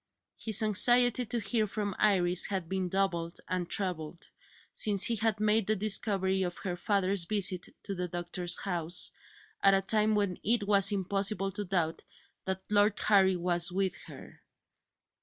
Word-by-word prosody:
His 220 0 +4
anxiety 245 +3 +4
to 235 +2 -2
hear 215 +1 -1
from 205 -1 -4
Iris 180 -4 +3
had 190 -4 -4
been 190 0 -3
doubled 175 -3 -2
and 180 -1 -4
trebled, 175 -4 -4 0.4
since 205 -3 +2
he 235 - +2
had 220 0 -1
made 215 -1 +1
the 215 - +1
discovery 195 -2 0
of 175 -2 -4
her 185 -3 -5
father's 195 -1 0
visit 190 -2 0 0.2
to 200 - -5
the 180 -1 -4
doctor's 175 +1 -1
house, 175 -2 -2 0.5
at 195 0 +4
a 195 - +1
time 215 +1 +1
when 200 -4 -2
it 225 +1 +1
was 200 0 +5
impossible 195 0 0
to 205 +2 -6
doubt 175 -4 -2 0.4
that 190 0 -4
Lord 205 0 +2
Harry 190 -3 +3
was 175 0 -1
with 190 0 -2
her. - - -13
195 Hz, 160 wpm, -29 LUFS, 180-210 Hz, 0.5 s, was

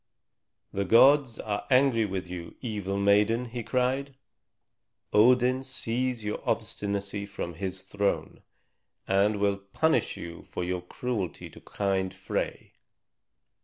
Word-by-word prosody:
"The 100 - 0
gods 130 +5 +5
are 105 -1 -3
angry 125 -4 +4
with 95 -2 -4
you, 90 -1 -7
evil 105 -5 -3
maiden!" 105 +4 +3
he 120 0 -5
cried. 130 +3 -1 1.0
"Odin 125 +3 +5
sees 125 -2 -2
your 105 - -3
obstinacy 100 0 -2
from 90 -3 -5
his 95 +2 -4
throne, 100 +1 -2 0.7
and 100 +2 +3
will 100 -1 +2
punish 110 +6 0
you 85 0 -8
for - - -5
your 90 0 -2
cruelty 100 -1 -4
to - - -14
kind 95 -2 -1
Frey. 95 0 -4
105 Hz, 120 wpm, -28 LUFS, 95-125 Hz, 1.0 s, gods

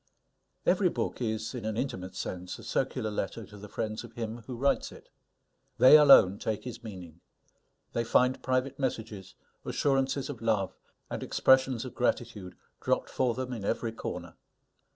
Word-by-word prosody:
Every - - +4
book - - -3
is, 110 -1 -2
in 125 -3 -5
an 110 0 -3
intimate 95 -8 -4
sense, 90 -1 -5
a 115 - -12
circular 115 -1 -1
letter 105 +2 -3
to 105 - -14
the 105 0 -10
friends 110 +1 -3
of - - -12
him 115 -1 -4
who 125 - -5
writes 140 +3 +1
it. - - -15 0.7
They 130 - +9
alone 135 -10 +8
take 110 -1 -2
his 125 -2 -8
meaning; 90 -6 -10 0.7
they 115 - 0
find 125 +2 +2
private 130 +1 -1
messages, 110 -7 -4 0.3
assurances 135 -1 0
of 140 -6 -7
love, 110 -4 0 0.4
and - - -3
expressions 130 -2 +3
of 130 - -7
gratitude, 105 -6 -2 0.2
dropped - - 0
for 125 -3 +1
them 130 0 -4
in 110 -4 -5
every 115 +3 -1
corner. 115 - -6
115 Hz, 160 wpm, -29 LUFS, 105-130 Hz, 0.7 s, They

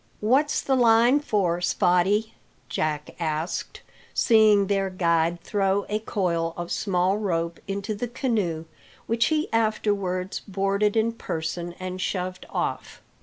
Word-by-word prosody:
"What's 270 +8 +2
the 270 - +1
line 240 +2 +5
for, 195 - 0
Spottie?" 190 +5 +2 0.4
Jack 150 -1 -2
asked, 160 0 -3 0.3
seeing 215 -3 +5
their 195 -1 0
guide 170 -2 +1
throw 200 -1 0
a 210 +1 0
coil 170 -6 -1
of 175 0 -5
small 190 0 +1
rope 170 -4 -2
into 200 +2 -3
the 225 +4 -3
canoe, 210 - -1 0.4
which 230 +1 +1
he 310 -1 +1
afterwards 205 -4 0
boarded 200 +2 0
in 225 +1 +2
person 170 -4 -4
and 185 0 -5
shoved 185 -1 -3
off. - - -4
195 Hz, 125 wpm, -25 LUFS, 175-220 Hz, 0.4 s, line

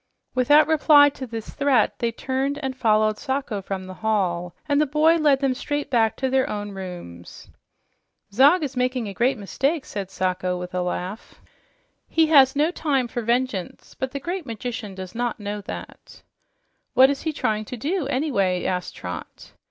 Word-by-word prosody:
Without 290 +4 +5
reply 295 -2 +6
to 270 -2 -8
this 225 -2 -7
threat, 280 -6 +1
they 235 -1 0
turned 265 +4 -2
and 265 -1 -2
followed 215 -3 +2
Sacho 265 -7 -2
from 190 0 -5
the 185 - -8
hall, 180 -5 -1
and 285 0 +3
the 305 - +2
boy 310 +4 +4
led 290 -4 +3
them 270 -2 +2
straight 290 +3 -4
back 225 -3 +2
to 265 - -1
their 260 0 +1
own 205 -1 -4
rooms. 175 - -9 0.8
"Zog 290 - +5
is 270 -2 -4
making 250 -2 0
a 200 - -6
great 245 +6 +1
mistake," 270 - -1
said 195 -2 -5
Sacho 185 -1 -1
with 180 0 -7
a 180 - 0
laugh. 180 +3 -5 0.7
"He 325 0 +3
has 275 -3 +6
no 300 +4 +2
time 280 -7 0
for 240 +1 -4
vengeance, 235 -4 -2
but 260 - -3
the 280 +1 -5
great 345 +1 -4
magician 225 -2 -5
does 185 0 -8
not 240 0 -2
know 205 0 -4
that." - - -9 0.7
"What 265 +2 +7
is 280 - -4
he 320 - -1
trying 215 -7 -1
to 250 - -7
do, 310 - -2
anyway?" 205 - 0
asked 180 -1 -2
Trot. 90 0 -8
250 Hz, 175 wpm, -23 LUFS, 200-280 Hz, 0.8 s, What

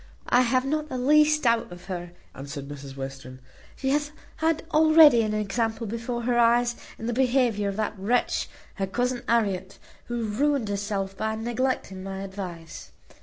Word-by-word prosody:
"I 245 - +5
have 255 +1 +2
not 305 +2 -1
the 255 - -3
least 300 +4 +4
doubt 230 -5 +2
of 175 0 -11
her," 175 -2 -6 0.2
answered 140 +1 -7
Mrs 140 -1 -9
Western. 135 -1 -7 0.4
"She 265 - -2
hath 295 +1 0 0.3
had 320 0 +1
already 310 -5 +7
an 215 -1 -1
example 220 +2 -1
before 230 +2 -4
her 240 0 +1
eyes 240 +1 +3 0.2
in 225 - -7
the 240 - -1
behaviour 245 -5 +2
of 195 - -4
that 215 -1 -3
wretch 235 +6 0 0.3
her 195 -1 -1
cousin 245 +5 -1
Harriet, 195 -5 0 0.3
who 240 -1 -3
ruined 255 +2 0
herself 200 -1 -2
by 220 +2 -2
neglecting 235 -4 -2
my 195 0 -5
advice. 185 -4 -8
225 Hz, 165 wpm, -26 LUFS, 195-250 Hz, 0.4 s, already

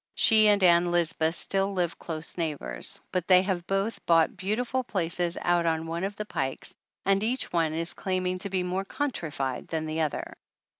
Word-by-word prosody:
She 215 -2 +6
and 205 -2 +4
Ann 175 0 +5
Lisbeth 165 -1 +1
still 195 +2 0
live 175 -3 -1
close 160 -1 -5
neighbors, 150 - -1
but 180 -2 -1
they 185 -1 +6
have 185 -3 -2
both 195 +3 -1
bought 165 -1 +4
beautiful 240 +6 -1
places 175 -4 -1
out 175 -1 +1
on 160 0 0
one 165 +2 -3
of 200 +1 -3
the 210 - -5
pikes 135 -9 -2 0.3
and 195 +1 +3
each 245 -1 -1
one 160 -2 +1
is 165 +1 -1
claiming 185 -1 -2
to 200 - 0
be 185 -1 0
more 185 +2 -2
countrified 160 - -3
than 160 -1 -3
the 155 +1 -2
other. 155 -2 -2
175 Hz, 185 wpm, -27 LUFS, 165-195 Hz, 0.3 s, She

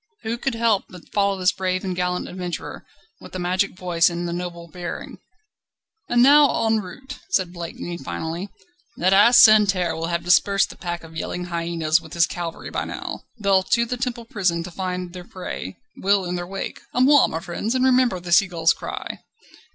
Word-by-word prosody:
Who 230 +2 -3
could 265 -2 -1
help 225 -3 +2
but 180 -2 -14
follow 200 -1 +2
this 185 0 +3
brave 185 0 -2
and 185 -2 -3
gallant 180 0 -1
adventurer, 180 -2 -6 0.3
with - - -13
the - - -4
magic 185 +1 -1
voice 175 -2 +2
and 175 0 -4
the 170 - -3
noble 175 -1 -6
bearing? 175 +2 -7 0.9
"And 240 0 +4
now 285 -3 +5
en 220 0 +2
route!" 255 +9 -9
said 180 -2 0
Blakeney 170 0 -6
finally, 160 - -5 0.5
"that 185 +2 +2
ass 230 +5 +7
Santerre 200 -5 +5
will 165 0 -3
have 170 0 -2
dispersed 195 +3 +3
the - - -12
pack 175 -2 -5
of 165 0 -13
yelling 180 +2 -4
hyenas 165 -1 +1
with 160 -2 -12
his 170 -1 +4
cavalry 170 -2 -6
by - - -2
now. - - -6
They'll 200 -3 +3
to 235 +5 +1
the 250 +2 -3
Temple 240 -2 -4
prison 180 -6 -1
to 180 - -8
find 180 0 -4
their 180 -1 -8
prey; 175 - -7 0.2
we'll 195 -1 +2
in 175 - -3
their 175 0 -4
wake. 195 +1 -6
A - - +1
moi, 265 - +5
friends! 190 +7 -3
and 255 0 +2
remember 255 -6 +3
the 175 0 -8
sea 195 +3 +6
gull's 165 -2 +2
cry." - - -6
180 Hz, 190 wpm, -22 LUFS, 170-210 Hz, 0.9 s, ass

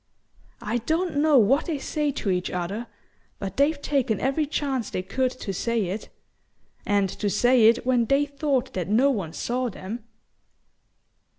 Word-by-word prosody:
I 230 +3 -1
don't 320 +6 -1
know 300 -1 +5
what 260 +7 +4
they 320 -4 -1
say 300 +2 -1
to 220 -7 -2
each 180 0 -1
other, 195 +7 -3 0.5
but 195 -1 -6
they've 285 +2 +3
taken 265 -7 0
every 280 +3 0
chance 270 -6 -2
they 185 - -3
could 255 +7 0
to 230 -6 -6
say 230 +5 -1
it... 200 +4 -5 0.8
and 205 -1 +3
to 205 +2 -3
say 245 +2 +4
it 230 +1 +3
when 250 -2 +3
they 275 +5 +3
thought 280 -2 -1
that 180 -1 -3
no 255 +7 +4
one 190 -10 -3
saw 245 +7 -2
them." 215 +3 -7
245 Hz, 165 wpm, -25 LUFS, 205-280 Hz, 0.8 s, know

